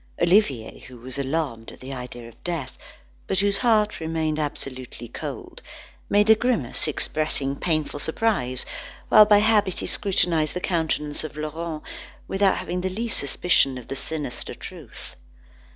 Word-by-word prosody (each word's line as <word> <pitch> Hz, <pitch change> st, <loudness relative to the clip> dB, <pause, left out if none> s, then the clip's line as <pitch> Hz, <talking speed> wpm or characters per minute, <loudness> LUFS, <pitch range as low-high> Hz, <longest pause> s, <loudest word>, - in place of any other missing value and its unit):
Olivier, 170 Hz, -, +2 dB
who 130 Hz, -1 st, -12 dB
was 130 Hz, +3 st, -7 dB
alarmed 135 Hz, -5 st, -2 dB
at -, -, -14 dB
the 130 Hz, +1 st, -7 dB
idea 125 Hz, -2 st, -7 dB
of 115 Hz, -, -17 dB
death, 170 Hz, -7 st, -3 dB, 0.5 s
but 190 Hz, -, 0 dB
whose 200 Hz, +1 st, +3 dB
heart 215 Hz, -4 st, +3 dB
remained 160 Hz, -1 st, -1 dB
absolutely 130 Hz, -5 st, -4 dB
cold, 120 Hz, -, -7 dB, 0.5 s
made 205 Hz, +1 st, +4 dB
a -, -, +11 dB
grimace 220 Hz, -, +1 dB
expressing 150 Hz, -2 st, 0 dB
painful 155 Hz, -2 st, -1 dB
surprise, 160 Hz, -, 0 dB, 0.4 s
while 215 Hz, -, +9 dB
by 210 Hz, 0 st, +6 dB
habit 210 Hz, -3 st, +3 dB
he -, -, -2 dB
scrutinised 170 Hz, -6 st, +1 dB
the -, -, 0 dB
countenance 160 Hz, -5 st, -1 dB
of 155 Hz, -1 st, -7 dB
Laurent, 155 Hz, +1 st, -4 dB, 0.4 s
without 195 Hz, 0 st, +2 dB
having 180 Hz, +1 st, -3 dB
the 185 Hz, -, -1 dB
least 225 Hz, +5 st, -2 dB
suspicion 140 Hz, -2 st, +2 dB
of 125 Hz, -, -10 dB
the -, -, -3 dB
sinister 150 Hz, -2 st, -4 dB
truth. -, -, -10 dB
155 Hz, 150 wpm, -24 LUFS, 135-195 Hz, 0.5 s, a